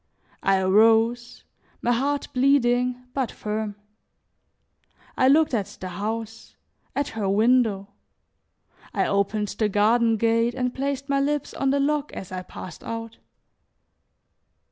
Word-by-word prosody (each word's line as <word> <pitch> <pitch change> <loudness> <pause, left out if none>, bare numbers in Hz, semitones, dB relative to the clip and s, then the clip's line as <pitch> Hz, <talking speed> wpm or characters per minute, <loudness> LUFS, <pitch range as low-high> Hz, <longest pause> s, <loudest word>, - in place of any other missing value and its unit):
I 195 0 +3
arose, 225 +5 +3 0.4
my 240 - +2
heart 280 +4 0
bleeding 250 -2 +2
but 265 -5 -1
firm. 210 -1 -4 1.4
I 255 - +3
looked 300 +1 +4
at 205 -3 -2
the 185 - -5
house, 220 +4 -5 0.4
at 285 0 -1
her 210 -3 -2
window; 215 -1 +2 1.1
I - - +2
opened 200 +1 0
the 210 +1 -1
garden 225 +3 +3
gate 230 +2 +1
and 250 -1 -1
placed 275 0 -3
my 280 -1 +1
lips 290 0 -1
on 270 - 0
the 280 +1 +2
lock 295 +1 0
as 190 - -8
I 185 0 -4
passed 185 -1 -10
out. 230 0 -6
230 Hz, 125 wpm, -24 LUFS, 210-260 Hz, 1.4 s, looked